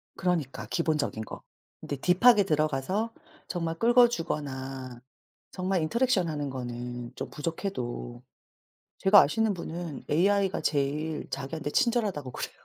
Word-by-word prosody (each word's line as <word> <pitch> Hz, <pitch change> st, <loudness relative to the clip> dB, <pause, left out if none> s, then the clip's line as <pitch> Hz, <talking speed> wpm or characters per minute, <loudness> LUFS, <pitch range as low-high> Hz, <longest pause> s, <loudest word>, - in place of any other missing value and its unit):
그러니까 170 Hz, -7 st, -1 dB
기본적인 150 Hz, -9 st, -1 dB
거. -, -, -9 dB, 0.4 s
근데 145 Hz, -, -4 dB
딥하게 200 Hz, -, +5 dB
들어가서 155 Hz, +7 st, 0 dB, 0.3 s
정말 165 Hz, -2 st, -2 dB
긁어 240 Hz, +3 st, +6 dB
주거나 135 Hz, -, -4 dB, 0.5 s
정말 185 Hz, -1 st, 0 dB
인터랙션 210 Hz, +2 st, +2 dB
하는 145 Hz, -2 st, -3 dB
거는 120 Hz, -1 st, -5 dB
좀 -, -, -5 dB
부족해도 125 Hz, -7 st, -4 dB, 0.8 s
제가 200 Hz, +1 st, +8 dB
아시는 220 Hz, +7 st, +1 dB
분은 170 Hz, -4 st, -6 dB
AI가 195 Hz, +4 st, +2 dB
제일 150 Hz, +2 st, -1 dB
자기한테 140 Hz, +3 st, -4 dB
친절하다고 205 Hz, -, +1 dB
그래요. -, -, -5 dB
160 Hz, 305 characters per minute, -28 LUFS, 135-195 Hz, 0.8 s, 제가